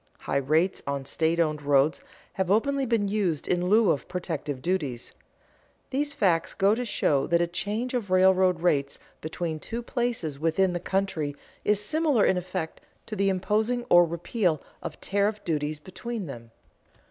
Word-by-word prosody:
High -, -, -1 dB
rates 155 Hz, +7 st, +1 dB
on 140 Hz, -1 st, -2 dB
state 160 Hz, +4 st, 0 dB
owned 155 Hz, -3 st, +1 dB
roads 145 Hz, +1 st, +2 dB, 0.3 s
have 190 Hz, -2 st, -1 dB
openly 270 Hz, +6 st, +2 dB
been 225 Hz, -3 st, +1 dB
used 195 Hz, -7 st, -1 dB
in 180 Hz, 0 st, +1 dB
lieu 215 Hz, -3 st, +5 dB
of 140 Hz, -, -2 dB
protective 160 Hz, -6 st, -4 dB
duties. 145 Hz, -6 st, -2 dB, 0.8 s
These 285 Hz, +2 st, 0 dB
facts 185 Hz, -, +1 dB
go 195 Hz, +2 st, +4 dB
to 245 Hz, +3 st, -1 dB
show 145 Hz, -, +1 dB
that 170 Hz, 0 st, +3 dB
a 170 Hz, -, +3 dB
change 210 Hz, +8 st, -3 dB
of 235 Hz, -6 st, -2 dB
railroad 185 Hz, -1 st, +4 dB
rates 140 Hz, -6 st, +1 dB, 0.2 s
between 160 Hz, 0 st, -4 dB
two 230 Hz, +9 st, -5 dB
places 230 Hz, -, -2 dB
within 170 Hz, +4 st, +2 dB
the 175 Hz, -, -2 dB
country 175 Hz, -6 st, -1 dB, 0.3 s
is 210 Hz, -1 st, +3 dB
similar 285 Hz, +1 st, +2 dB
in -, -, +3 dB
effect 180 Hz, -2 st, -4 dB, 0.2 s
to 215 Hz, -, -5 dB
the 195 Hz, -1 st, +2 dB
imposing 215 Hz, +6 st, 0 dB
or 175 Hz, 0 st, +8 dB
repeal 170 Hz, 0 st, -1 dB, 0.2 s
of -, -, -7 dB
tariff 205 Hz, +2 st, 0 dB
duties 150 Hz, -2 st, -2 dB
between 210 Hz, +6 st, -6 dB
them. 120 Hz, -6 st, -9 dB
180 Hz, 160 wpm, -27 LUFS, 155-210 Hz, 0.8 s, or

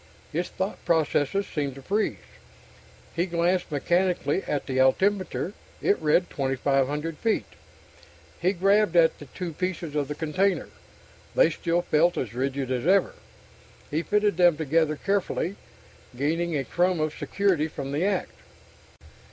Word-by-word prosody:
His 175 Hz, +3 st, -2 dB
thought 190 Hz, +2 st, -4 dB
processes 165 Hz, +3 st, +1 dB
seemed 145 Hz, -7 st, -3 dB
to 135 Hz, -, -11 dB
freeze. 205 Hz, +7 st, 0 dB, 1.0 s
He 170 Hz, +2 st, 0 dB
glanced 175 Hz, +1 st, 0 dB
mechanically 175 Hz, +2 st, +1 dB
at 145 Hz, -, -1 dB
the 130 Hz, -1 st, -1 dB
altimeter. 190 Hz, +7 st, +2 dB, 0.3 s
It 200 Hz, -, +1 dB
read 155 Hz, +3 st, +3 dB
2,500 140 Hz, +3 st, 0 dB
feet. 225 Hz, -2 st, +1 dB, 1.0 s
He 180 Hz, -, +3 dB
grabbed 195 Hz, 0 st, +2 dB
at 165 Hz, -1 st, +4 dB
the 145 Hz, -, -9 dB
two 175 Hz, +3 st, -6 dB
pieces 175 Hz, -2 st, -3 dB
of 145 Hz, -2 st, 0 dB
the 150 Hz, -, -4 dB
container. 180 Hz, +6 st, 0 dB, 0.7 s
They -, -, +5 dB
still 175 Hz, 0 st, 0 dB
felt 170 Hz, +2 st, +2 dB
as 115 Hz, -4 st, -3 dB
rigid 135 Hz, +1 st, -2 dB
as 130 Hz, +4 st, -1 dB
ever. 195 Hz, +1 st, +4 dB, 0.8 s
He 155 Hz, +2 st, 0 dB
fitted 205 Hz, 0 st, +1 dB
them 175 Hz, -3 st, +5 dB
together 155 Hz, 0 st, +1 dB
carefully, 195 Hz, 0 st, -1 dB, 0.6 s
gaining 165 Hz, +4 st, 0 dB
a 135 Hz, -, -1 dB
crumb 175 Hz, +6 st, +1 dB
of 155 Hz, 0 st, 0 dB
security 190 Hz, -6 st, +1 dB
from 140 Hz, -3 st, -6 dB
the 145 Hz, +5 st, 0 dB
act. 195 Hz, -2 st, -1 dB
165 Hz, 140 wpm, -26 LUFS, 145-185 Hz, 1.0 s, They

